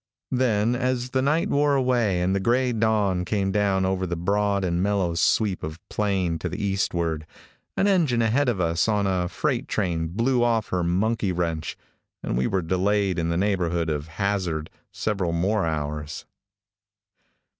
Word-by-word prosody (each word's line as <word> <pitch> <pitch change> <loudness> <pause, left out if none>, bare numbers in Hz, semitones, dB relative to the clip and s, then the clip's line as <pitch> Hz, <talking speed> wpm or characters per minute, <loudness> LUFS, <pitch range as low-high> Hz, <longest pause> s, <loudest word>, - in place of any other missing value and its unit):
Then, 120 -2 +2
as 125 0 -1
the 130 - +1
night 150 +5 +1
wore 145 0 +3
away 120 -9 +1
and 95 +2 +1
the - - +1
gray 125 +5 +1
dawn 105 -5 +1
came 95 +1 -1
down 95 -2 +1
over 95 0 -1
the 85 - -2
broad 100 +3 0
and 85 0 0
mellow 95 -3 +1
sweep 95 +3 +1
of 80 +1 -5
plain 95 -5 0
to - - -3
the 90 - -5
eastward, 85 -6 -1 0.5
an - - +3
engine 160 - +3
ahead 125 +5 +2
of 110 -6 -1
us 85 +1 +1
on 105 -2 +1
a 90 -2 0
freight - - -1
train 80 -2 -1
blew 120 +8 +1
off 115 -3 +1
her 90 -1 0
monkey 100 +4 0
wrench, 85 -3 -2 0.5
and - - -2
we 65 +1 +1
were 95 -2 0
delayed 95 +1 +1
in 85 0 -1
the 85 - 0
neighborhood 85 -4 0
of 75 0 -3
Hazzard 95 -6 -1 0.2
several 95 -6 -1
more 95 +3 +1
hours. 75 -1 -4
95 Hz, 165 wpm, -24 LUFS, 85-110 Hz, 0.5 s, wore